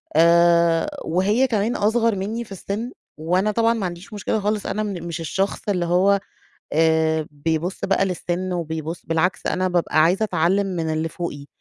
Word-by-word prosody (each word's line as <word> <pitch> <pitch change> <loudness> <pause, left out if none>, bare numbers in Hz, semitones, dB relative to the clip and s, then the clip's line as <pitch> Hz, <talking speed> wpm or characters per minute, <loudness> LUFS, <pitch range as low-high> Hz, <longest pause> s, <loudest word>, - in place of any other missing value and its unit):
آآ 170 0 +4 0.2
وهي 205 +10 +2
كمان 225 0 0
أصغر 225 +1 +2
مني 215 +5 -3
في 210 - -18
السن، 205 +5 -4 0.3
وأنا 180 +6 +1
طبعًا 230 +2 +2
ما 220 -4 -2
عنديش 175 +4 -7
مشكلة 210 +1 -1
خالص 210 0 -1
أنا 215 - -2
من 195 -5 -4
مش 170 -1 -5
الشخص 190 +5 -1
اللي 180 -3 0
هو، 190 +3 +3 0.5
آآ، 160 0 +2
بيبُص 160 +5 -2
بقى 195 0 +2
للسن 180 0 -2
وبيبُص 160 -1 -4
بالعكس 165 +3 0
أنا 185 0 0
بابقى 170 -3 +2
عايزة 185 +6 +3
أتعلم 195 +1 +1
من 170 -4 -2
اللي 160 +1 -1
فوقي، 150 -4 -6
180 Hz, 165 wpm, -22 LUFS, 165-200 Hz, 0.5 s, آآ